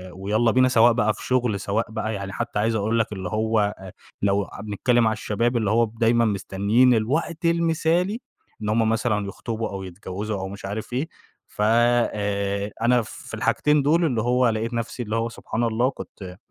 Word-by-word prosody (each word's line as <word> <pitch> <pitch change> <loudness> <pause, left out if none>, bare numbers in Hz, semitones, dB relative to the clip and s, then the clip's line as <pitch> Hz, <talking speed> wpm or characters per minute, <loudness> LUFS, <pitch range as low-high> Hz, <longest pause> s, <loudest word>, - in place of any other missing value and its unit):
ويالّا 105 +5 +1
بينا، 130 +2 +4
سواء 120 -1 +5
بقى 110 -2 +2
في - - -11
شغل 125 -5 +1
سواء 110 +3 -2
بقى 110 0 -3
يعني 100 -1 -5
حتى 120 0 -3
عايز 110 +2 +1
أقول 110 +2 0
لك 110 -1 -1
اللي 95 -3 -5
هو 110 +2 +1 0.2
آآ، 95 -1 -10 0.3
لو 100 0 +2
ع - - -10
بنتكلم 115 +3 +1
على 110 - +2
الشباب 115 +3 -1
اللي 110 -3 0
هو 115 +1 +4
دايمًا 115 +1 +2
مستنيين 105 +4 +2
الوقت 155 - -1
المثالي 170 +4 +1 0.4
إن 105 - -2
هُم 110 0 +2
مثلًا 110 -3 0
يخطبوا 115 +2 -4
أو 95 -1 -6
يتجوزوا 95 +3 -5
أو 95 - -4
مش 100 0 -8
عارف 105 +4 -5
إيه، 135 +6 -1 0.4
ف - - -7
آآ، 105 -3 +1
أنا 120 +1 +4
في 110 - -10
الحاجتين 150 0 +2
دول 160 +5 +3
اللي 125 -8 0
هو 125 +1 +3
لقيت 115 +2 -2
نَفسي 120 +1 -3
اللي 110 0 -3
هو 115 +1 0
سبحان 115 0 -4
الله 120 +2 +1
كنت 95 -8 -10
110 Hz, 190 wpm, -24 LUFS, 105-120 Hz, 0.4 s, سواء